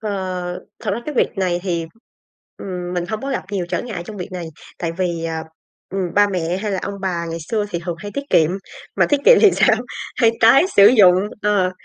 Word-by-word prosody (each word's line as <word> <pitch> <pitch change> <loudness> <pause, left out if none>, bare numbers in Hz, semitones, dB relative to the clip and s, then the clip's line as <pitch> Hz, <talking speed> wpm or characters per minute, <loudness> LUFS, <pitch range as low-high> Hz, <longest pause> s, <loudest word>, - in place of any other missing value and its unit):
Ờ, 215 -1 -3 0.7
thật 220 - -2
ra 205 +4 -2
cái 300 - -4
việc - - +3
này 180 -2 0
thì, 170 -3 -2 0.7
ừm, 180 -2 -5
mình 175 -1 -1
hông 220 0 -3
có 275 - -3
gặp 265 - -2
nhiều 185 -3 -2
trở - - -2
ngại 215 -8 -5
trong 215 - -8
việc 185 0 -7
này, 180 -2 -5 0.3
tại 170 -1 -2
vì, 170 -2 -2
à, 160 -1 -3 0.5
ừm, 185 -2 -3
ba 205 0 +5
mẹ 180 -2 -2
hay 205 +1 -3
là 190 - -1
ông 200 - -4
bà 175 -3 -2
ngày 165 - -4
xưa 215 -2 0
thì 170 - -2
thường 175 -2 -3
hay 205 +3 -7
tiết 280 - -3
kiệm, 160 -1 +4 0.5
mà - - +4
tiết 290 -1 +2
kiệm - - +8
thì 420 - +7
sao? 220 - +3 0.4
Hay 230 -3 +4
tái 230 +8 +7
sử 200 0 +9
dụng 205 -7 +6 0.3
ờ, 205 -3 +2
190 Hz, 230 wpm, -20 LUFS, 175-215 Hz, 0.7 s, sử